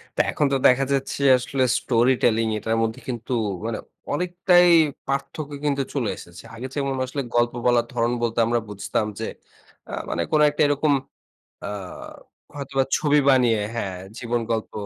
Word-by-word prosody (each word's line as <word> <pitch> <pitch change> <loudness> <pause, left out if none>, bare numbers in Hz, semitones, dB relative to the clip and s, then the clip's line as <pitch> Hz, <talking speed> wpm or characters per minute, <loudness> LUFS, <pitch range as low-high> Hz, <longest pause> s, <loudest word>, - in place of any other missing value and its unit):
তো - - -5
এখন 150 - +1
তো - - +3
দেখা 130 +2 +4
যাচ্ছে 135 +1 -2 0.2
আসলে 130 +1 -1 0.2
স্টোরি 120 +1 +3
টেলিং 115 -1 +3
এটার 110 +1 -1
মধ্যে 110 0 -2
কিন্তু 125 +1 -4 0.3
মানে 115 -1 -2 0.4
অনেকটাই 180 +1 +4 0.4
পার্থক্য 140 +2 -3
কিন্তু 140 -1 +1
চলে 125 -7 -1
এসেছে। 85 0 -12
আগে 125 +3 -6
যেমন 140 -1 -1
আসলে 140 +2 -4
গল্প 120 0 +2
বলার 120 -1 +3
ধরন 115 +1 +1
বলতে 115 0 0
আমরা 120 +1 +1
বুঝতাম 100 +1 -2
যে, 110 - -2 0.7
আ - - -7 0.2
মানে - - -1
কোনো 150 -1 +4
একটা 145 - -3
এরকম 145 +1 +2 0.7
আ - - -4 0.9
হয়তোবা 135 -1 -1
ছবি 150 -1 +3
বানিয়ে 120 -5 +3
হ্যাঁ, 95 -5 -3 0.2
জীবন 120 0 -1
গল্প 110 -1 -2
125 Hz, 160 wpm, -23 LUFS, 115-140 Hz, 0.9 s, দেখা